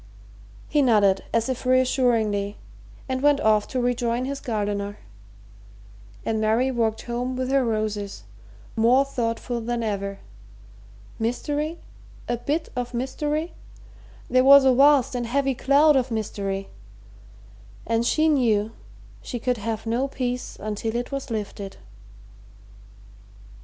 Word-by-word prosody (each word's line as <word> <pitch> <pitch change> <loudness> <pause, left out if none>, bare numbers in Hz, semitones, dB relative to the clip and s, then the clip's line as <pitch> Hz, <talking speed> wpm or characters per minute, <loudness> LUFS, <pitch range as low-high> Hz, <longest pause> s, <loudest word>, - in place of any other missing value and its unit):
He 295 - +2
nodded 205 -7 +3
as 230 0 +1
if 260 -2 -3
reassuringly 240 -6 +2 0.5
and 260 -1 -2
went 290 0 +4
off 215 -4 +3
to 255 - -2
rejoin 245 0 0
his 275 +1 -4
gardener, 205 -2 -3 1.3
and 220 -1 0
Mary 225 +5 +2
walked 225 -3 -1
home 245 +2 -3
with 255 +1 -2
her 275 -1 +3
roses, 215 - -2 0.5
more 245 +5 +4
thoughtful 240 -2 -3
than 235 +1 -2
ever. 200 -2 -3 1.0
Mystery? 295 +8 -2 0.5
a 240 - 0
bit 300 +7 -2
of 245 0 -3
mystery? 295 +6 -2 0.7
There 255 0 +3
was 275 0 +8
a 260 - +6
vast 275 0 +5
and 240 -1 -2
heavy 275 +2 +1
cloud 285 +4 +4
of 260 -1 +1
mystery, 200 -3 -3 1.2
and 230 0 +1
she 310 +6 +2
knew 225 -8 +2 0.5
she 245 - -5
could 250 +1 -1
have 220 +1 -4
no 240 +4 0
peace 250 -2 -4
until 215 +2 -3
it 245 +3 -3
was 275 -1 -4
lifted. 205 -3 -5
240 Hz, 125 wpm, -24 LUFS, 220-265 Hz, 1.3 s, was